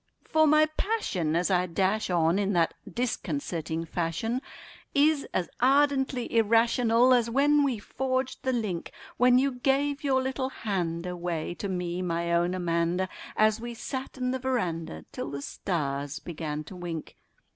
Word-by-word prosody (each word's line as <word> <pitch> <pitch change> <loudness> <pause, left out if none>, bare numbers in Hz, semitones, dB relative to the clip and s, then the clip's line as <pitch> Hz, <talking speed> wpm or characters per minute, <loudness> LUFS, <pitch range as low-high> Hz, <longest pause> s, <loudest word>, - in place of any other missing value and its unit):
For 315 0 +4
my 305 +1 +6
passion 190 - 0
as 175 +3 +1
I 180 0 +2
dash 190 +5 0
on 170 +1 +2
in 200 0 0
that 170 -2 +2 0.2
disconcerting 165 - -2
fashion 175 +10 -2 0.5
Is 290 0 +3
as 180 - -1
ardently 265 -2 +2
irrational 230 +2 +4
as 235 -2 +3
when 290 +4 +4
we 265 -5 +1
forged 260 +4 -2
the 260 - 0
link 210 -9 -2 0.3
When 250 0 +5
you 275 +2 +3
gave 275 +3 0
your 270 -2 +3
little 260 0 -2
hand 180 -8 -2
away 175 -2 -3
to 200 +3 -5
me, 180 -1 -2
my 170 -1 -1
own 175 +2 +2
Amanda 175 +1 0 0.3
An 215 0 +5
we 240 0 -5
sat 260 +3 -5
'n 250 -1 -1
the 260 - -2
veranda 170 - -2
till - - -5
the 140 0 -5
stars 145 -5 -3
began 155 -3 -5
to 185 - -11
wink. 170 -3 -6
200 Hz, 155 wpm, -28 LUFS, 170-260 Hz, 0.5 s, my